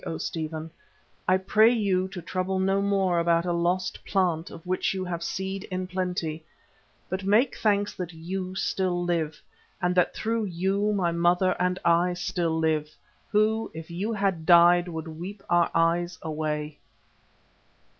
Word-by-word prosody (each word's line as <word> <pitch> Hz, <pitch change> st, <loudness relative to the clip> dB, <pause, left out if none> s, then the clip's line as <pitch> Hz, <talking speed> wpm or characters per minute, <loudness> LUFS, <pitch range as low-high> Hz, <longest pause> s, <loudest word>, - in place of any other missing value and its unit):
O 160 Hz, -, -4 dB
Stephen, 160 Hz, 0 st, -4 dB, 0.6 s
I 185 Hz, -, +5 dB
pray 215 Hz, +4 st, +4 dB
you 195 Hz, -5 st, +1 dB
to 190 Hz, -3 st, -8 dB
trouble 185 Hz, +2 st, -2 dB
no 195 Hz, +1 st, +2 dB
more 195 Hz, -3 st, +2 dB
about 170 Hz, 0 st, +2 dB
a 175 Hz, -, 0 dB
lost 180 Hz, +2 st, -1 dB
plant 175 Hz, -4 st, 0 dB
of 165 Hz, -, -11 dB
which 185 Hz, +1 st, 0 dB
you 185 Hz, -1 st, -3 dB
have 170 Hz, -2 st, -4 dB
seed 190 Hz, +2 st, -4 dB
in 185 Hz, 0 st, -3 dB
plenty, 180 Hz, -4 st, -3 dB, 0.6 s
but 190 Hz, +2 st, -3 dB
make 215 Hz, +7 st, +3 dB
thanks 205 Hz, -1 st, +1 dB
that 180 Hz, -2 st, -4 dB
you 185 Hz, +3 st, -5 dB
still 185 Hz, -2 st, 0 dB
live 165 Hz, -3 st, -1 dB, 0.4 s
and 180 Hz, -1 st, +1 dB
that 180 Hz, -1 st, +2 dB
through 225 Hz, 0 st, -1 dB
you 195 Hz, +3 st, 0 dB
my 185 Hz, -4 st, +1 dB
mother 175 Hz, +2 st, +2 dB
and 180 Hz, 0 st, +1 dB
I 170 Hz, +1 st, +3 dB
still 175 Hz, -2 st, -1 dB
live, 155 Hz, -2 st, +1 dB, 0.4 s
who, 220 Hz, +1 st, +2 dB
if 160 Hz, +1 st, -8 dB
you 195 Hz, +6 st, -2 dB
had 195 Hz, -6 st, 0 dB
died, 175 Hz, 0 st, +6 dB
would 160 Hz, -2 st, -5 dB
weep 180 Hz, +6 st, -8 dB
our 175 Hz, -1 st, +4 dB
eyes 175 Hz, +2 st, +1 dB
away." 150 Hz, -1 st, -3 dB
180 Hz, 155 wpm, -26 LUFS, 170-190 Hz, 0.6 s, died